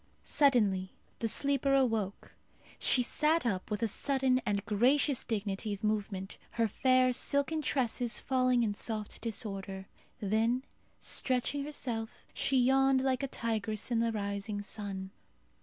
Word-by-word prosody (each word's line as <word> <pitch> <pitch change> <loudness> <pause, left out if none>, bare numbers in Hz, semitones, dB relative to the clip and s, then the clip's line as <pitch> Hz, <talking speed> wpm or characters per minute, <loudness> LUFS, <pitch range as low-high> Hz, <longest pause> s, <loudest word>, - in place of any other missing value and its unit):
Suddenly 210 -10 +2 0.3
the 230 - 0
sleeper 275 +3 +2
awoke. 225 -7 0 0.5
She 250 - +3
sat 305 +4 +2
up 190 -6 -1
with 210 0 -2
a - - +3
sudden 260 +3 +1
and 200 -1 0
gracious 255 +6 +2
dignity 205 -1 -2
of 195 - -16
movement, 200 -3 -2
her 230 -1 +2
fair 255 +3 +3
silken 280 +5 0
tresses 245 -4 0
falling 255 -2 +2
in 210 -2 0
soft 215 0 -4
disorder. 195 -4 -4 0.3
Then 225 +5 +1 0.4
stretching 265 +2 0
herself, 240 -7 -5
she 270 - +1
yawned 265 +1 +4
like 260 -2 +1
a 275 - -1
tigress 220 -2 -3
in 235 - +2
the 230 0 +1
rising 205 0 -3
sun. 195 -2 -5
230 Hz, 135 wpm, -32 LUFS, 205-260 Hz, 0.5 s, yawned